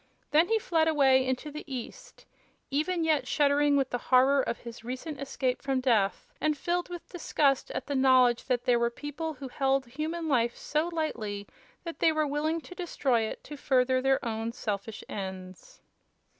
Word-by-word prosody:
Then 315 +4 +5
he 450 - +3
fled 330 -6 +1
away 270 -4 +4
into 260 +4 -2
the 300 +1 -7
east, 250 -3 -8 0.5
even 330 +5 0
yet 315 -3 +1
shuddering 290 0 +3
with 270 -2 0
the 245 - -1
horror 270 +2 +5
of 240 - -2
his 235 -1 -10
recent 260 +5 -6
escape 260 -2 -2
from 270 -1 0
death 225 -7 +1 0.2
and 305 -1 +1
filled 350 +4 -1
with 350 -1 -8
disgust 285 -6 +1
at - - -4
the 285 - -3
knowledge 255 -3 +4
that 250 -2 -1
there 240 -1 +3
were 235 0 +2
people 290 +6 -5
who 270 0 -7
held 270 +1 +1
human 310 +6 -4
life 240 -5 +1
so 305 +3 -1
lightly 225 -12 -3 0.4
that 335 -1 -7
they 325 - +4
were 310 -1 +1
willing 305 +3 -1
to 360 - -11
destroy 295 - 0
it 220 - -4
to 300 - -8
further 260 -2 +2
their 270 0 +1
own 225 0 -3
selfish 215 -1 -4
ends. 190 -2 -8
270 Hz, 180 wpm, -29 LUFS, 245-310 Hz, 0.5 s, Then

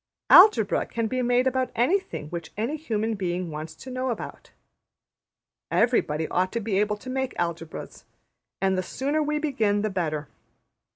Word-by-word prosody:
Algebra 415 +4 +7
can 230 -1 -2
be 255 +3 -1
made 245 +1 +2
about 260 0 +1
anything 260 - 0
which 170 -1 -6
any 235 +8 -1
human 225 -7 -2
being 180 -3 -3
wants 155 +1 -6
to 260 - -10
know 255 +1 -2
about. 230 - -6 1.2
Everybody 160 -10 +1
ought 185 +1 +1
to 235 - 0
be 205 -3 0
able 210 0 +1
to 210 - -14
make 265 0 -2
Algebras; 170 -1 -5 0.5
and 190 0 +2
the 185 - 0
sooner 280 - -1
we 300 0 0
begin 220 -9 0
the 215 - -1
better. 155 -5 -2
220 Hz, 160 wpm, -26 LUFS, 180-260 Hz, 1.2 s, Algebra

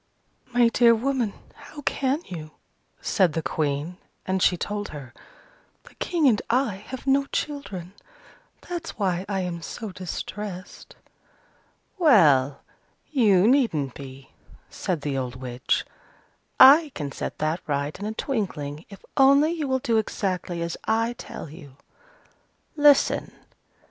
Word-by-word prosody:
"My 240 -1 +3
dear 235 0 +5
woman, 245 -3 -1 0.2
how 290 0 -12
can 275 +5 0
you?" 155 -4 -8 0.5
said 185 -6 +2
the 165 - -2
Queen: 150 +3 -2 0.3
and 190 -1 -1
she 180 - +4
told 205 +3 -3
her, 135 -5 -9 0.7
"The - - -17
King 330 -5 +1
and 220 -5 +3
I 240 -5 +1
have 260 0 -7
no 275 0 +3
children: 200 - -4 0.7
that's 345 -2 -5
why 185 -3 -1
I 195 -2 -1
am 175 -2 -4
so 215 +5 -6
distressed." 185 +1 -7 1.0
"Well, 145 - +4 0.5
you 210 -9 +4
needn't 200 - +2
be," 135 -1 -11 0.4
said 175 -5 -3
the 140 -2 -2
old 125 -1 -4
witch. 125 0 -2 0.7
"I 290 +3 +8
can 145 -3 -4
set - - -5
that 155 +3 -1
right 145 0 -1
in 205 - -4
a 215 - -3
twinkling, 165 - -3
if 200 - -13
only 280 +3 +5
you 320 -4 -2
will 260 0 +1
do 235 -3 0
exactly 185 -5 -2
as 170 0 -4
I 225 +2 +1
tell 235 - -8
you. 140 -3 -13 1.0
Listen. 290 -2 +4
195 Hz, 135 wpm, -25 LUFS, 155-260 Hz, 1.0 s, I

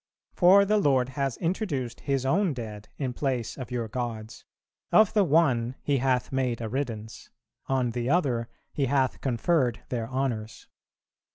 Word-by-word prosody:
For 195 +3 +6
the 210 +1 +2
Lord 130 -8 +2
has 135 -2 -2
introduced 165 - -2
His 135 -2 -1
own 175 +2 +2
dead 105 -3 -7
in 130 -3 -2
place 125 -4 -2
of 130 -3 -7
your 120 -2 -2
gods; 115 -1 -5 0.5
of 215 -2 +5
the 210 - +4
one 130 -7 +2
He 140 -1 +1
hath 125 -1 0
made 130 -3 -1
a 115 - -3
riddance, 115 -3 -5 0.4
on 130 -3 +1
the 120 +1 -2
other 130 -8 +1 0.2
He 140 -2 0
hath 130 -1 +1
conferred 125 - +1
their 115 -3 -3
honours. 125 -5 -3
130 Hz, 155 wpm, -27 LUFS, 120-145 Hz, 0.5 s, For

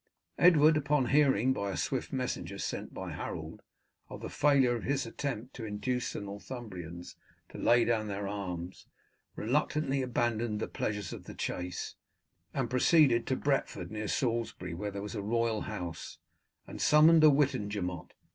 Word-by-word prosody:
Edward, 155 -3 +6
upon 145 -3 +1
hearing, 135 -4 +4
by 100 -5 -2
a 95 - -3
swift 130 -3 -2
messenger 125 -8 -3
sent - - -4
by - - -6
Harold, - - -6 0.5
of - - -8
the - - -6
failure 135 -4 +4
of 115 - -4
his 135 +1 -1
attempt 125 0 -4
to 115 - -7
induce 110 +4 -2
the - - -4
Northumbrians 100 -5 -8 0.3
to - - -9
lay 120 0 +4
down 110 -2 +1
their 100 0 -3
arms, 90 -3 -5 0.5
reluctantly 140 +3 0
abandoned 120 -3 0
the - - -2
pleasures 105 -2 -3
of - - -9
the - - -9
chase, 90 0 -4 0.6
and - - -1
proceeded 130 -2 +4
to 130 - +1
Bretford, 140 -5 -1
near 110 0 -4
Salisbury, 115 -7 -1
where 105 +5 -3
there 100 0 -6
was 105 - -6
a 105 - -3
royal 115 +1 0
house, 90 -6 -6 0.5
and - - -8
summoned 155 +1 +6
a 155 - +9
Witenagemot. 105 - 0
115 Hz, 155 wpm, -31 LUFS, 100-135 Hz, 0.6 s, a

